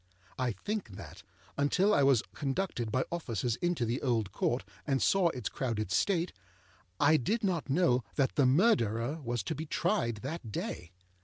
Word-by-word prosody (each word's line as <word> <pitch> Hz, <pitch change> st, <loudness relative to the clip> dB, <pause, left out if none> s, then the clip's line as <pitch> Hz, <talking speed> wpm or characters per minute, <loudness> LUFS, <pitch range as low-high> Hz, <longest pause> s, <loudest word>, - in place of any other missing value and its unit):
I 125 Hz, -2 st, 0 dB
think 205 Hz, -, -4 dB
that, -, -, -10 dB, 0.4 s
until 185 Hz, +9 st, +3 dB
I 145 Hz, -, +4 dB
was 135 Hz, -5 st, +4 dB
conducted 135 Hz, -, -2 dB
by 130 Hz, +3 st, +1 dB
officers 120 Hz, -, -2 dB
into 175 Hz, -8 st, 0 dB
the 115 Hz, +3 st, -2 dB
Old 115 Hz, -7 st, 0 dB
Court 120 Hz, +5 st, 0 dB, 0.2 s
and 135 Hz, -2 st, +2 dB
saw 195 Hz, +3 st, +3 dB
its 125 Hz, -9 st, -4 dB
crowded 110 Hz, -7 st, -2 dB
state, 175 Hz, -, +1 dB, 0.7 s
I 155 Hz, +2 st, +5 dB
did 215 Hz, -, -1 dB
not 175 Hz, -7 st, -1 dB
know 135 Hz, -5 st, +3 dB
that 135 Hz, -2 st, +1 dB
the 140 Hz, -3 st, +3 dB
Murderer 130 Hz, -, +2 dB
was 120 Hz, -5 st, -2 dB
to 130 Hz, -, -2 dB
be 155 Hz, +1 st, -5 dB
tried 115 Hz, -6 st, 0 dB
that 135 Hz, -5 st, -5 dB
day. 85 Hz, -3 st, -4 dB
135 Hz, 165 wpm, -31 LUFS, 115-165 Hz, 0.7 s, I